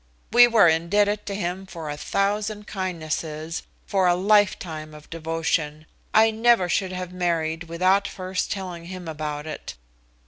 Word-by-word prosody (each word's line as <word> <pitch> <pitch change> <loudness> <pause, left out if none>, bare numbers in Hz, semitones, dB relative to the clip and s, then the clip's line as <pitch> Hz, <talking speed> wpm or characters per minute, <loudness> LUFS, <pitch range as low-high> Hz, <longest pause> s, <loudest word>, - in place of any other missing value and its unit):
We 240 0 +9
were 225 -6 +6
indebted 205 +6 +2
to 200 - -3
him 190 0 -3
for 165 -4 -7
a 145 - -3
thousand 205 +6 -1
kindnesses, 165 -4 -4 0.2
for 190 -2 +2
a 175 - +4
lifetime 180 -6 +1
of 150 0 -13
devotion. 160 -2 -2 0.3
I 220 +1 +5
never 225 -3 +3
should 185 +1 0
have 180 -1 -5
married 165 -2 -1
without 185 +4 +2
first 185 0 -3
telling 180 -4 -5
him 180 -1 -8
about 150 -1 -4
it. 155 - -7
180 Hz, 145 wpm, -24 LUFS, 160-200 Hz, 0.3 s, We